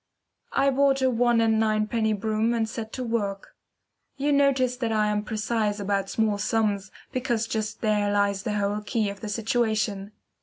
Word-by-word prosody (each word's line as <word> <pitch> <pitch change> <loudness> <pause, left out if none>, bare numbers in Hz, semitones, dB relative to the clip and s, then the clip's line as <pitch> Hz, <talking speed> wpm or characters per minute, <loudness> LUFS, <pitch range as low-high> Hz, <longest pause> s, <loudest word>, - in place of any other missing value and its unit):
I 275 0 +3
bought 270 0 +2
a 260 - +3
one 240 0 +3
and 220 -1 +3
ninepenny 220 0 +1
broom 220 +2 0
and 225 -1 0
set 220 -1 -6
to 255 - -3
work. 205 -4 -3 0.6
You 285 +2 0
notice 275 -3 +3
that 235 -3 -1
I 215 -1 +2
am 210 0 0
precise 215 -1 -1
about 195 -1 -1
small 215 -2 0
sums, 205 -2 0 0.2
because 245 -3 -1
just 220 -1 -3
there 210 -2 +1
lies 200 -1 +1
the 210 - -3
whole 205 0 -1
key 210 -1 -1
of 200 - -10
the 215 - -6
situation. 215 -2 -1
220 Hz, 175 wpm, -26 LUFS, 210-235 Hz, 0.6 s, I